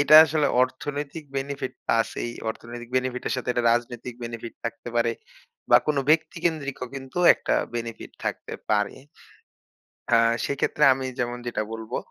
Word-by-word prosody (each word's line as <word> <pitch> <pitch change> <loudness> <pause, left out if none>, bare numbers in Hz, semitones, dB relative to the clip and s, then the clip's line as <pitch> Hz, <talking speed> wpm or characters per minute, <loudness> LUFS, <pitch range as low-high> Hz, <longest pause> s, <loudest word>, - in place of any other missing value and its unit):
এটা 145 +1 +6
আসলে 155 -1 +1 0.2
অর্থনৈতিক 145 +4 -3
বেনিফিট 135 -1 -3 0.3
আছেই। 115 +1 -3 0.2
অর্থনৈতিক 120 +1 -9
বেনিফিট 130 0 -1
এর - - -1
সাথে 125 - -4
একটা 120 -1 0
রাজনৈতিক 120 0 -2
বেনিফিট 115 0 -6
থাকতে 115 +1 -5
পারে। 115 0 +3 0.6
বা - - +10
কোন 150 - +1
ব্যক্তিকেন্দ্রিকও 155 -4 0
কিন্তু 135 +4 -6 0.2
একটা - - -1 0.2
বেনিফিট 115 -1 -5
থাকতে - - -3 0.2
পারে। 105 -1 +1 1.2
আ - - +7 0.3
সেক্ষেত্রে 140 +1 0
আমি 130 0 -4
যেমন 120 0 -1
যেটা 115 -2 -1
বলবো 110 -1 -4
125 Hz, 140 wpm, -25 LUFS, 120-140 Hz, 1.2 s, বা